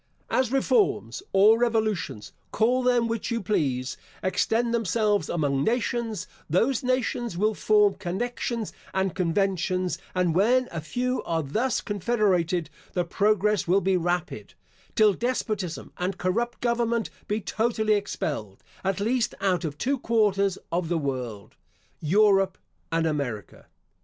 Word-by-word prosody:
* - - -39
As 255 -2 +2
reforms, 370 - +1
or 210 +4 +6
revolutions, 220 - -1 0.2
call 245 +4 +2
them 245 -2 +2
which 230 -2 -2
you 235 -1 0
please, 135 - -1 0.3
extend 230 +5 +1
themselves 215 -1 +1
among 140 -4 0
nations, 235 - -1 0.2
those 225 - +2
nations 250 -5 -1
will 215 +3 +2
form 210 -1 +3
connections 215 +4 -3 0.2
and 190 -2 +1
conventions, 185 0 0 0.2
and 180 -2 +2
when 245 +8 +3
a 165 - -4
few 250 +10 -1
are 165 -1 -1
thus 220 - 0
confederated, 190 -5 +1 0.3
the 180 - +1
progress 210 +1 +1
will 185 +3 +4
be 190 0 +1
rapid, 175 - -2 0.4
till 215 -2 +5
despotism 215 -6 -3
and 185 +1 -2
corrupt 235 +7 -1
government 235 -1 0 0.2
be 210 +1 0
totally 220 +1 0
expelled, 145 - -3 0.2
at 195 0 0
least 230 +3 0
out 190 -2 +1
of 150 -3 -4
two 270 - 0
quarters 200 -5 +2
of 170 -1 -1
the 175 - +1
world, 125 - -4 0.5
Europe 195 +3 +3 0.3
and 165 0 +1
America. 135 - -3
200 Hz, 130 wpm, -26 LUFS, 175-230 Hz, 0.5 s, or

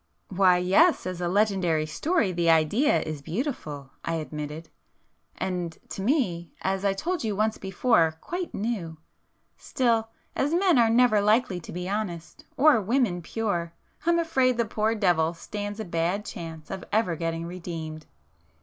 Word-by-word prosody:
"Why 185 -1 +4
yes, 195 - +4
as 185 -1 -4
a 175 - 0
legendary 185 -5 +2
story 225 - 0
the 170 -1 +1
idea 165 - +3
is 155 -2 -5
beautiful,"—I 160 - -4
admitted—"And 160 +3 -7
to - - -5
me, 190 - 0
as 190 +1 -1
I 200 -1 +2
told 345 - -2
you 215 -3 -1
once 215 +2 0
before, 190 -4 +2
quite 355 - -4
new. 195 -7 -3 0.6
Still, 230 -3 0 0.3
as 290 +5 +1
men 360 -6 +4
are 230 -1 +5
never 230 -2 +4
likely 210 -2 +2
to 165 - -10
be 180 +1 -4
honest 185 -5 -4
or 280 -5 +5
women 215 -4 +1
pure, 170 -3 -2 0.3
I'm 340 0 +4
afraid 265 -7 +2
the 235 - +2
poor 220 +1 0
devil 175 -5 +2
stands 205 +4 -6
a 220 - -3
bad 175 +4 -1
chance 160 -2 -8
of 190 - -5
ever 210 -6 +1
getting 165 0 -3
redeemed!" 165 -3 -6
190 Hz, 150 wpm, -26 LUFS, 165-230 Hz, 0.6 s, are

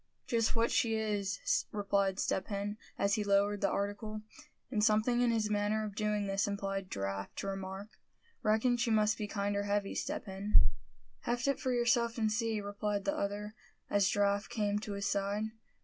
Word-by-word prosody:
"Just 230 0 +1
what 230 0 +2
she 225 -2 +2
is," 205 -3 0
replied 200 -2 +1
Step 190 -1 0
Hen, 205 0 -3 0.2
as 200 0 +2
he 210 - +1
lowered 200 0 +2
the 200 - +3
article; 210 +2 -3 0.5
and 210 -4 +1
something 220 +3 +3
in 245 - +4
his 220 -2 +1
manner 210 +1 +1
of 210 - -5
doing 210 0 0
this 195 +1 0
impelled 195 -1 -3
Giraffe 100 0 -3
to - - -4
remark: 195 +1 -5 0.4
"Reckon 220 +3 +3
she 240 0 +1
must 215 -1 +3
be 210 - -2
kinder 200 -1 -1
heavy, 205 0 0
Step - - -3
Hen?" 195 +2 +3 0.6
"Heft 240 +2 -1
it 275 - +1
for 260 - -1
yourself, 235 -1 +2
and 220 -2 +1
see," 225 -1 0
replied 205 0 -2
the 195 - +1
other, 205 +1 -3 0.4
as 200 -1 +4
Giraffe 200 0 +1
came 205 -2 0
to 210 -1 -5
his 200 0 -3
side. 200 +2 0
205 Hz, 180 wpm, -33 LUFS, 200-220 Hz, 0.6 s, in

